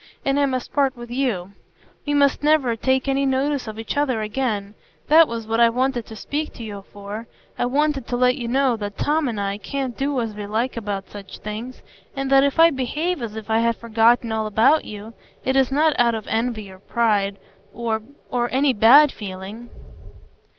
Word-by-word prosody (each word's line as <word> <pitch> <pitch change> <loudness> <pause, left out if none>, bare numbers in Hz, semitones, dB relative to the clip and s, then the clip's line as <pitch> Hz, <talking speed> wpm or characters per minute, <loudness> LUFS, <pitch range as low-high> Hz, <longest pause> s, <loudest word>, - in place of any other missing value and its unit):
And 275 +1 +2
I 285 - +3
must 255 -2 -4
part 275 -3 +1
with 240 0 -9
you; 235 -8 -1 0.6
we 290 - +1
must 280 -1 +3
never 290 -6 +3
take 260 +3 0
any 275 0 +1
notice 270 -1 0
of 215 0 -7
each 225 -1 -4
other 265 -6 0
again. 210 -3 -2 0.4
That 320 +1 +7
was 230 -1 -5
what 225 +1 -1
I 235 -1 +6
wanted 250 0 -1
to 220 - -9
speak 300 +7 -4
to 235 - -9
you 200 -3 -8
for. 205 +3 -7 0.3
I 245 - +1
wanted 280 -1 0
to 245 - -2
let 250 0 +3
you 235 - -5
know 260 0 +2
that 205 -1 -6
Tom 300 0 +1
and 225 -4 -3
I 200 0 -2
can't 265 +2 -4
do 275 -1 -1
as 225 -3 -3
we 205 -1 -6
like 225 +5 -1
about 205 -4 -4
such 200 -2 -9
things, 220 +4 -7 0.3
and 270 0 -3
that 270 0 +6
if 280 +3 0
I 330 0 +7
behave 300 +5 -2
as 225 -2 -5
if 220 -1 -7
I 220 - +3
had 230 0 +2
forgotten 230 +1 +2
all 220 -1 -1
about 240 +9 +3
you, 210 +2 -9 0.3
it 265 - +1
is 270 -1 +3
not 305 +3 +3
out 235 -1 +3
of 220 - -5
envy 220 -3 -2
or 190 - -14
pride—or—or 225 +4 -2
any 270 +1 +3
bad 265 +7 +7
feeling." 200 +4 -8
240 Hz, 200 wpm, -22 LUFS, 220-270 Hz, 0.6 s, That